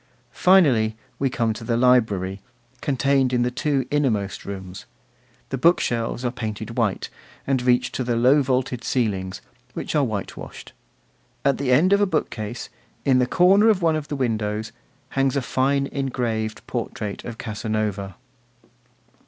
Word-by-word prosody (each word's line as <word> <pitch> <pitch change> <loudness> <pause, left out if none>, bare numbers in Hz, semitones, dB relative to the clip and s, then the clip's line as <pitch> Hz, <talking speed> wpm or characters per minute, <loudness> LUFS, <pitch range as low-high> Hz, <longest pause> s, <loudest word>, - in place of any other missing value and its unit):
Finally, 130 -13 +4 0.2
we 135 - +1
come 115 -3 0
to 115 - -9
the 115 0 0
library, 105 -6 +2 0.4
contained 135 -1 +2
in 125 -1 +2
the 125 - 0
two 135 0 0
innermost 115 -10 0
rooms. 95 -1 -7 0.6
The 135 - -3
book 170 +6 +5
shelves 120 +1 -2
are 120 - +1
painted 110 -2 -5
white, 110 -6 -1 0.3
and 135 -2 +1
reach 125 0 +2
to 130 - -2
the 120 -1 0
low 130 +5 +5
vaulted 125 -2 -1
ceilings, 100 -6 -1 0.3
which - - -4
are 150 -2 +3
whitewashed. 110 -6 -6 0.7
At 140 - +2
the 135 -2 0
end 170 +10 +5
of 200 - +4
a 205 - +4
bookcase, 120 - -3 0.4
in 130 -2 +4
the 125 - +2
corner 195 - +5
of 195 -5 +2
one 160 -1 +3
of 155 -1 -4
the 145 - -3
windows, 110 -4 -2 0.4
hangs 135 -1 +1
a 140 - +1
fine 135 +3 +1
engraved 120 -6 -3
portrait 105 -2 -4
of 115 -2 -7
Casanova. 105 -3 -3
125 Hz, 150 wpm, -23 LUFS, 110-140 Hz, 0.7 s, book